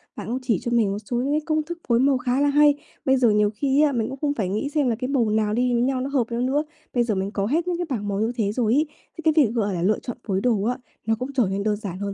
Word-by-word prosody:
bạn -, -, -7 dB
cũng 245 Hz, +3 st, -2 dB
chỉ 235 Hz, -8 st, 0 dB
cho 240 Hz, -, -3 dB
mình 225 Hz, -4 st, +2 dB
một 200 Hz, -, -2 dB
số 240 Hz, -, -2 dB
những 270 Hz, +4 st, 0 dB
cái 305 Hz, -, +1 dB
công 310 Hz, -1 st, +1 dB
thức 340 Hz, +2 st, -6 dB
phối 235 Hz, -1 st, +3 dB
màu 270 Hz, +1 st, +3 dB
khá 250 Hz, +2 st, 0 dB
là 290 Hz, -, +3 dB
hay. 295 Hz, 0 st, +5 dB, 0.3 s
Bây 265 Hz, 0 st, +4 dB
giờ 245 Hz, -3 st, +4 dB
nhiều 210 Hz, 0 st, +3 dB
khi 275 Hz, +5 st, +2 dB
á, 300 Hz, -1 st, +4 dB
mình 230 Hz, -4 st, -1 dB
cũng 270 Hz, -, -6 dB
không 290 Hz, -2 st, +1 dB
phải 210 Hz, -9 st, -2 dB
nghĩ 215 Hz, +9 st, -2 dB
xem 295 Hz, -2 st, +1 dB
là 235 Hz, -, +1 dB
cái 250 Hz, +3 st, -4 dB
màu 255 Hz, -5 st, +1 dB
nào 210 Hz, 0 st, +1 dB
đi 245 Hz, +2 st, +1 dB
với 235 Hz, -, +2 dB
nhau 260 Hz, +1 st, 0 dB
nó 265 Hz, -, -3 dB
hợp 275 Hz, -3 st, +2 dB
với 235 Hz, 0 st, -2 dB
nhau -, -, +1 dB
nữa. 290 Hz, +3 st, +1 dB, 0.3 s
Bây 245 Hz, -, +2 dB
giờ 225 Hz, -3 st, -1 dB
mình 190 Hz, +1 st, -2 dB
có 200 Hz, -2 st, -1 dB
hết 320 Hz, -, 0 dB
những 355 Hz, -1 st, 0 dB
cái 350 Hz, -, -2 dB
bảng 215 Hz, -6 st, -3 dB
màu 200 Hz, -1 st, -1 dB
như 220 Hz, +2 st, +1 dB
thế 210 Hz, -4 st, 0 dB
rồi 225 Hz, 0 st, +1 dB
ấy, 300 Hz, +4 st, +2 dB, 0.3 s
thế -, -, -14 dB
cái 315 Hz, 0 st, +4 dB
việc, 220 Hz, -, -3 dB
gọi 205 Hz, -4 st, 0 dB
là, 175 Hz, -, -2 dB
lựa 200 Hz, +4 st, +2 dB
chọn 245 Hz, -, -6 dB
phối 195 Hz, -2 st, 0 dB
đồ 220 Hz, -4 st, +1 dB
á, 245 Hz, +3 st, 0 dB, 0.3 s
nó 225 Hz, 0 st, +2 dB
cũng 260 Hz, +2 st, -4 dB
trở 260 Hz, -3 st, +3 dB
nên 195 Hz, +1 st, -2 dB
đơn 210 Hz, 0 st, +1 dB
giản 195 Hz, -4 st, -6 dB
hơn 200 Hz, 0 st, -3 dB
240 Hz, 340 wpm, -23 LUFS, 210-275 Hz, 0.3 s, hay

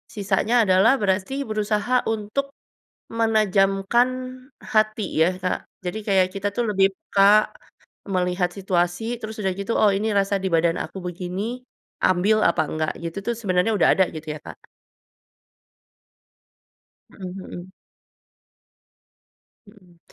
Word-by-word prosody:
sisanya 215 Hz, +3 st, 0 dB
adalah 190 Hz, +6 st, +5 dB
berarti 190 Hz, +4 st, 0 dB, 0.2 s
berusaha 215 Hz, +3 st, 0 dB
untuk, 225 Hz, +6 st, -3 dB, 0.6 s
menajamkan 215 Hz, +1 st, +2 dB, 0.6 s
hati 215 Hz, 0 st, +2 dB, 0.2 s
ya 180 Hz, +3 st, +3 dB
Kak? 180 Hz, -, 0 dB, 0.2 s
Jadi 180 Hz, +5 st, -3 dB
kayak 190 Hz, -2 st, +4 dB
kita 200 Hz, +1 st, -3 dB
tuh 240 Hz, -, 0 dB
lebih 195 Hz, -1 st, +4 dB
peka, 205 Hz, +2 st, +4 dB, 0.6 s
melihat 180 Hz, 0 st, +1 dB
situasi 180 Hz, 0 st, -1 dB, 0.2 s
terus 220 Hz, 0 st, -7 dB
udah 190 Hz, -, +1 dB
gitu, 215 Hz, +4 st, -2 dB
“Oh 210 Hz, -2 st, +5 dB
ini 210 Hz, +2 st, -1 dB
rasa 200 Hz, 0 st, +2 dB
di -, -, 0 dB
badan 165 Hz, +1 st, +1 dB
aku -, -, -6 dB
begini, 185 Hz, +7 st, -4 dB, 0.5 s
ambil 195 Hz, +4 st, +3 dB
apa 170 Hz, -1 st, +2 dB
enggak.” 155 Hz, 0 st, -1 dB
Gitu 165 Hz, +3 st, -5 dB
tuh 235 Hz, -, 0 dB
sebenarnya 185 Hz, 0 st, +1 dB
udah -, -, +4 dB
ada 190 Hz, -, +4 dB
gitu 155 Hz, 0 st, -8 dB
ya -, -, -9 dB
Kak? -, -, -10 dB, 2.5 s
Mhm 185 Hz, -2 st, -8 dB
mhm. 185 Hz, -1 st, -9 dB, 2.0 s
Mhm. 180 Hz, -4 st, -20 dB
195 Hz, 120 wpm, -23 LUFS, 180-215 Hz, 2.5 s, adalah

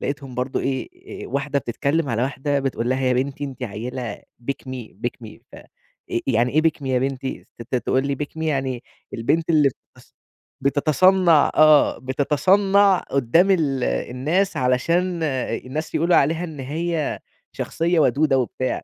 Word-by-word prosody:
لقيتهم 140 Hz, -2 st, -5 dB
برضو 125 Hz, +2 st, -2 dB
إيه 130 Hz, -1 st, -5 dB
واحدة 140 Hz, +2 st, -1 dB
بتتكلم 140 Hz, +5 st, -1 dB
على 115 Hz, 0 st, 0 dB
واحدة 140 Hz, +2 st, -1 dB
بتقول 130 Hz, -3 st, -2 dB
لها 130 Hz, +1 st, 0 dB
يا 130 Hz, -1 st, +2 dB
بنتي 135 Hz, +3 st, -2 dB
أنتِ 135 Hz, -2 st, -8 dB
عيلة 120 Hz, +1 st, -5 dB, 0.3 s
pick 135 Hz, -1 st, -6 dB
me 125 Hz, -3 st, -7 dB
،pick -, -, +1 dB, 0.2 s
me، -, -, -12 dB
ف -, -, -12 dB
آآ، -, -, -12 dB, 0.6 s
يعني 120 Hz, -1 st, +1 dB
إيه 155 Hz, +1 st, +3 dB
pick 160 Hz, -3 st, +1 dB
me 135 Hz, -, -5 dB
يا 130 Hz, -1 st, +1 dB
بنتي؟ 135 Hz, 0 st, -4 dB, 0.2 s
ت -, -, +1 dB
تقول 130 Hz, +2 st, 0 dB
لي 140 Hz, -, -1 dB
pick 150 Hz, -, -7 dB
me -, -, -3 dB
يعني 135 Hz, -5 st, -1 dB, 0.3 s
البنت 155 Hz, +9 st, 0 dB
اللي 150 Hz, -4 st, +5 dB, 0.3 s
بتص -, -, -21 dB, 0.5 s
بتتصنَّع، 160 Hz, +4 st, +4 dB
آه 155 Hz, -1 st, +5 dB
بتتصنَّع 190 Hz, +9 st, +3 dB
قدام 140 Hz, +9 st, +2 dB
ال 150 Hz, -8 st, +1 dB
الناس 135 Hz, -, -1 dB
علشان 170 Hz, +8 st, +1 dB
الناس 130 Hz, +1 st, -3 dB
يقولوا 170 Hz, +2 st, +3 dB
عليها 160 Hz, +5 st, +2 dB
إن 155 Hz, -5 st, -7 dB
هي 155 Hz, +3 st, -2 dB, 0.3 s
شخصية 170 Hz, +1 st, -1 dB
ودودة 140 Hz, +1 st, +3 dB
وبتاع، 130 Hz, +1 st, -2 dB
140 Hz, 155 wpm, -22 LUFS, 130-160 Hz, 0.6 s, اللي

